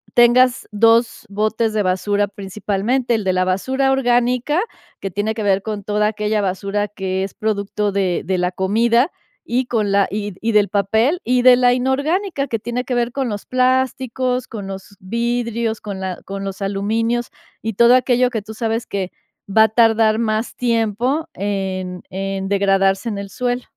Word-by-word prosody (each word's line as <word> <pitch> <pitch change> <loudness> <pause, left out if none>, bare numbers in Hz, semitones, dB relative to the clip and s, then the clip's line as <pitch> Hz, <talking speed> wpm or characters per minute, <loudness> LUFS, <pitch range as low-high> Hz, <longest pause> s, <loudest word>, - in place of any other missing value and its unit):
tengas 245 +1 +4
2 225 +2 +3
botes 215 +2 0
de 210 -2 +1
basura 200 +2 +1
principalmente. 210 +5 -2
El 215 - -2
de 185 -1 +1
la 185 0 +2
basura 265 +9 0
orgánica, 250 +4 +2 0.4
que 195 - -4
tiene 205 +4 -1
que 220 - -3
ver 195 -1 +2
con 210 -2 -4
toda 210 +1 +1
aquella 210 0 -1
basura 200 +2 -1
que 190 -2 -3
es 195 - -5
producto 205 -1 -1
de 190 -3 0
de 185 -1 0
la 180 0 0
comida, 230 - +2 0.4
y 255 +1 +1
con 215 -5 0
la 200 0 +3
y 205 -1 -3
y 230 +1 0
del 210 -1 +3
papel, 220 - +1
y 250 0 +2
de 250 0 +8
la 245 -1 +4
inorgánica, 280 +6 0
que 225 - -2
tiene 240 +3 -3
que 250 - -3
ver 240 0 0
con 265 -2 -2
los 205 -1 -5
plásticos, 255 0 0
con 205 -4 -7
los 195 +1 -8
vidrios, 235 +2 -2
con 200 -2 -6
la 185 -1 -4
con 195 0 -5
los 195 +1 -6
aluminios, 225 +5 -1 0.3
y 225 -1 -2
todo 235 +4 +6
aquello 250 0 +3
que 220 -4 -4
tú 220 - -9
sabes 225 0 -2
que 190 -2 -3 0.4
va 220 +2 +6
a 220 - +3
tardar 225 -1 +3
más 220 0 -1
tiempo 240 +5 0
en 190 -2 -3
en 195 0 -3
degradarse 195 +2 +2
en 205 - -4
el 200 -1 -6
suelo. 245 +2 -2
220 Hz, 175 wpm, -19 LUFS, 200-245 Hz, 0.4 s, de